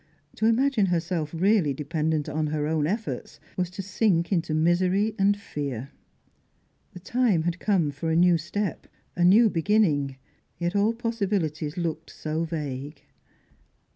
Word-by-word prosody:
To 220 - +2
imagine 230 -2 +3
herself 165 -3 -1
really 175 -4 +2
dependent 155 +1 -1
on 155 +1 -1
her 150 0 -1
own 155 -1 0
efforts, 215 +5 -4 0.2
was 180 -2 -1
to 185 +2 -6
sink 190 -3 +1
into 165 -4 0
misery 180 +6 +2
and 200 +1 +3
fear. 140 - -5 1.0
The 180 - -9
time 215 -4 +1
had 175 +1 -2
come 180 -8 +1
for 145 +4 -4
a 160 - +1
new 175 0 +4
step, 200 +3 -3 0.3
a 175 - +1
new 210 +6 +6
beginning, 165 -8 +1 0.4
yet 175 +2 -2
all 205 +3 +3
possibilities 200 -10 -2
looked 165 -2 -3
so 155 +1 -3
vague. 150 -3 -5
170 Hz, 140 wpm, -26 LUFS, 155-200 Hz, 1.0 s, new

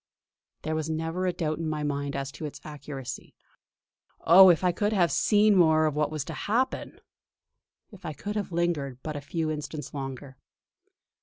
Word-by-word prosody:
There 155 - -2
was 155 0 -2
never 165 +3 -2
a - - +2
doubt 165 -3 -3
in 165 -1 -2
my 155 -1 -3
mind 140 -1 -2
as 135 0 -3
to 155 - -7
its 145 - -10
accuracy. 140 -3 -8 0.9
Oh! 185 +3 +8
if 175 0 +3
I 180 - +3
could 205 +4 -1
have 175 -4 +3
seen 210 -1 +4
more 160 -3 +5
of 155 -2 0
what 150 0 +1
was 155 -3 -4
to 160 - -6
happen; 235 +11 -2 0.9
if 200 -3 -14
I 155 - -4
could 205 +8 -6
have 205 -3 -3
lingered 165 -6 -1
but 155 -1 -4
a 145 - -4
few 160 +2 -2
instants 150 0 -6
longer! 135 -1 -7
155 Hz, 180 wpm, -27 LUFS, 145-180 Hz, 0.9 s, Oh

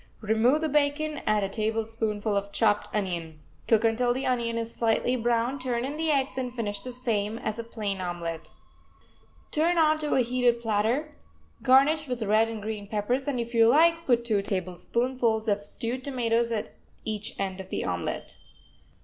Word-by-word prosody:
Remove 225 +7 +3
the 320 - +1
bacon, 300 +1 0
add 215 -1 +3
a - - 0
tablespoonful 220 0 -2
of 200 0 -2
chopped 210 -1 +2
onion. 170 -6 -3 0.3
Cook 225 -1 +4
until 240 +2 +2
the 265 - -2
onion 235 -2 0
is 230 0 -2
slightly 230 +2 +1
brown, 240 +2 0
turn 250 -1 -1
in 280 +2 -4
the 320 +1 -1
eggs 270 -2 +1
and 250 -1 -3
finish 210 -4 -3
the 255 - -6
same 225 -4 -1
as 220 0 -3
a - - -3
plain 210 -4 -4
omelet. 170 -3 -4 1.0
Turn 335 +3 +2
onto 310 -2 +3
a 260 - +4
heated 245 -1 +2
platter, 230 +7 0 0.5
garnish 285 +4 +4
with 250 -3 -2
red 215 +2 +3
and 220 -2 -6
green 210 -1 -5
peppers, 225 +6 -1
and, 270 -4 -1
if 235 0 -4
you 230 -1 +5
like, 330 +6 +4
put 240 -2 +3
two 215 -4 +2
tablespoonfuls 220 +5 -1
of 205 -1 +1
stewed 240 +4 -3
tomatoes 235 -3 0
at 220 -2 -3 0.3
each 215 -1 -4
end 190 -1 -2
of 190 - -12
the - - -2
omelet. 90 -1 -3
230 Hz, 175 wpm, -27 LUFS, 210-255 Hz, 1.0 s, you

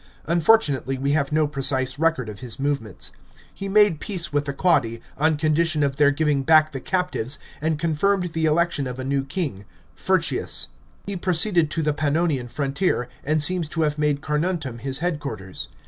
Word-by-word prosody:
Unfortunately 160 -6 +2
we 140 +2 0
have 145 -1 +1
no 155 0 +3
precise 135 -2 -1
record 160 -7 +1
of 105 -1 -8
his 125 0 -4
movements. 135 -8 -2 0.4
He 195 0 -5
made 205 -5 +4
peace 170 -7 -3
with 145 0 +1
the 140 - -2
Quadi, 135 -8 +1 0.2
on 155 +1 +2
condition 155 0 +2
of 135 -1 0
their 145 -1 +5
giving; 145 -1 +1
back 155 +2 +5
the 135 - -5
captives, 180 -7 -1 0.2
and 160 0 0
confirmed 170 +3 0
the 160 -1 0
election 155 -3 +1
of 125 0 -6
a 130 - -4
new 135 +1 0
king, 135 - -3 0.3
Furtius. - - 0 0.4
He 200 +1 -4
proceeded 175 -2 +2
to 160 +1 -2
the 150 0 +1
Pannorian 150 -3 0
frontier, 140 -1 -1
and 155 +1 +2
seems 175 -1 0
to 160 0 0
have 150 0 -1
made 150 -1 +1
Carnuntum 150 -5 -2
his 135 +2 -1
headquarters. 140 - -4
150 Hz, 175 wpm, -23 LUFS, 135-165 Hz, 0.4 s, their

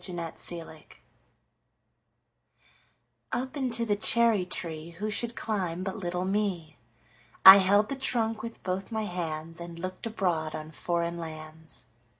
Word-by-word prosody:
Foreign 180 -2 -6
Lands 165 0 -3 2.8
UP 255 +2 -3
into 245 -4 +1
the 210 -2 +1
cherry 220 -2 +3
treeWho 170 +4 -4
should 235 +3 -2
climb 185 -5 -2
but 190 0 -3
little 180 -3 -3
me?I 165 - +4
held 200 +2 +4
the 275 - -1
trunk 225 -4 0
with 230 0 -8
both 190 +3 -3
my 220 -1 -2
handsAnd 170 -1 -5
looked 185 +5 -5
abroad 175 -8 -1
on 155 0 -7
foreign 170 +1 -2
lands. 160 0 -9
185 Hz, 120 wpm, -28 LUFS, 165-215 Hz, 2.8 s, me?I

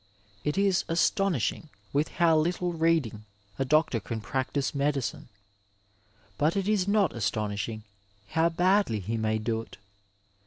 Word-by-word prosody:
It 150 - -1
is 195 -2 +3
astonishing 175 -1 +1 0.2
with 145 +3 +2
how 170 -2 +5
littie 175 +3 0
reading 160 -10 +1 0.3
a 135 - +1
doctor 150 -3 +2
can 110 +2 -5
practise 130 +4 -2
medicine, 140 -2 -1 1.1
but 155 +6 +2
it 195 0 -1
is 205 -3 +2
not 200 -5 +2
astonishing 105 -1 -2 0.5
how 165 +1 +2
badly 180 - +2
he 105 +4 -3
may 110 -1 0
do 110 +1 -1
it. 115 - -13
150 Hz, 130 wpm, -28 LUFS, 115-175 Hz, 1.1 s, how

